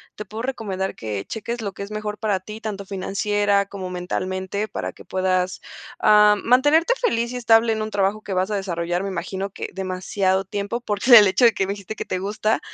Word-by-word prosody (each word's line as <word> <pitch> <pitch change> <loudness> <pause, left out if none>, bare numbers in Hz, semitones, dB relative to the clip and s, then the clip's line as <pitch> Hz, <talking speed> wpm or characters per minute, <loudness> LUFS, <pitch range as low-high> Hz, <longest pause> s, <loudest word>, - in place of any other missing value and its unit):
te 210 - -7
puedo 215 +3 -7
recomendar 205 -7 -3
que 105 -3 -4
cheques 230 +2 -5
lo 200 -2 -3
que - - -9
es 200 - -9
mejor 215 0 -4
para 210 -3 -1
ti, 215 +3 -9
tanto 200 -3 -5
financiera 200 +1 0
como 190 -2 -6
mentalmente, 185 +3 -3
para - - -4
que - - -16
puedas, 185 -1 0 0.4
ah, 210 0 +6
mantenerte 290 - +4
feliz 235 - 0
y 250 - -4
estable 225 -1 +4
en 220 - -1
un 215 - -3
trabajo 205 +1 0
que 195 - -5
vas 185 +3 0
a - - 0
desarrollar, 175 -2 -2
me 195 - -3
imagino 190 +2 -4
que - - -6
demasiado 190 0 -1
tiempo, 205 +4 -4
por 205 -4 -2
el 225 -5 +10
hecho 190 +6 +3
de 230 - +6
que 195 - 0
me 195 - -3
dijiste 205 +2 -8
que - - -4
te 185 - -2
gusta. 210 +3 0
200 Hz, 210 wpm, -22 LUFS, 190-215 Hz, 0.4 s, el